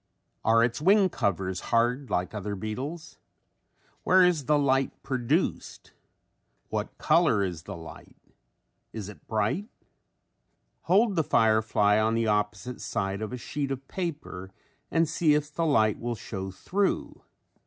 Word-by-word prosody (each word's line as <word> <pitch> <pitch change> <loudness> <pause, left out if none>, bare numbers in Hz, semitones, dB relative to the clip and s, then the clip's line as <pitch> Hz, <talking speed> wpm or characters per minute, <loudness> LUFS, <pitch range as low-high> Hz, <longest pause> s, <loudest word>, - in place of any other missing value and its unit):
Are 115 +1 +4
its 120 +3 -1
wing 195 +3 +5
covers 95 - -1
hard 120 +4 +1
like 90 +3 -1
other 105 -1 -4
beetles? 135 - -6 0.8
Where 185 0 +5
is 165 -6 +1
the 150 +2 +3
light 135 -2 +2
produced? 125 -3 -2 0.8
What - - -4
color 100 - +3
is 90 -4 -3
the - - -8
light? 80 -1 -12 0.8
Is 105 -3 -6
it 105 - -14
bright? 110 - -1 1.2
Hold 200 +3 +4
the 160 - +2
firefly 110 -3 +3
on 110 +1 +2
the 115 0 +1
opposite 105 +2 -1
side 95 +1 -2
of 110 - -4
a 125 - -4
sheet 140 +3 -4
of 135 0 -5
paper 150 - -5 0.4
and 165 0 +2
see 155 -1 +2
if 150 0 -2
the 165 +1 0
light 110 -8 +3
will 120 0 -3
show 95 -3 -6
through. 195 - -2
120 Hz, 140 wpm, -27 LUFS, 105-150 Hz, 1.2 s, wing